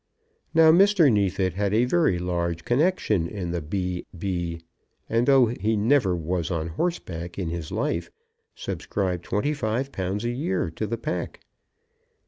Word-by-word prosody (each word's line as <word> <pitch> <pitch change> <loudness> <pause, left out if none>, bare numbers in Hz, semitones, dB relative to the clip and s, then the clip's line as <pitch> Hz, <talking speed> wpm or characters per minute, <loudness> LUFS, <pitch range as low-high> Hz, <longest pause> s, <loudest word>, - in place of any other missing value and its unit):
Now, 160 -1 +7
Mr. 185 -4 +5
Neefit 95 -3 +1
had 100 +2 0
a 120 +3 +4
very 155 - +2
large 85 -1 -2
connexion 120 - +1
in 90 -3 -4
the 85 -1 -2
B. 90 +3 -3
B., 85 -2 -3 0.5
and, 115 +2 +1
though 135 -2 +6
he 110 -1 -1
never 105 -3 +3
was 85 0 -2
on 85 -2 -2
horseback 85 - -3
in 90 -4 -2
his 85 -2 -5
life, 85 0 -1 0.5
subscribed 90 -4 -3
twenty 145 +9 0
five 130 0 -2
pounds 95 +4 -3
a 120 - 0
year 95 - -1
to 105 +6 -4
the 115 - -2
pack. 90 -6 -4
100 Hz, 150 wpm, -25 LUFS, 85-120 Hz, 0.5 s, Now